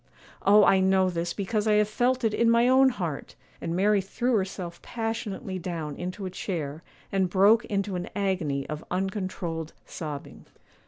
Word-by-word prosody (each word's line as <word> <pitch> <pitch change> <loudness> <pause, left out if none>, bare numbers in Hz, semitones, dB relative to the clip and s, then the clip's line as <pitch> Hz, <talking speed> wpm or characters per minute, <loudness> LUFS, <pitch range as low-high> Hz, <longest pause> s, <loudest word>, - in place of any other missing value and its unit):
Oh, 205 +1 +6
I 190 - +5
know 190 -1 +3
this 170 0 -2
because 210 +3 -1
I 215 - +4
have 210 0 +4
felt 250 +4 +1
it 220 -2 +2
in 230 +1 +3
my 235 +1 +4
own 260 +1 +6
heart!' 175 - -5 0.3
and 165 - -2
Mary 200 +2 +3
threw 240 +6 -1
herself 190 -4 -2
passionately 220 -4 -4
down 165 -4 -4
into 185 +3 -5
a 185 - -4
chair, 160 -5 -4 0.3
and 190 -2 +1
broke 205 +5 +5
into 200 -1 -2
an 175 - -4
agony 180 -9 -1
of 150 +1 -5
uncontrolled 185 -4 -3
sobbing. 150 -3 -7
190 Hz, 165 wpm, -27 LUFS, 175-210 Hz, 0.3 s, Oh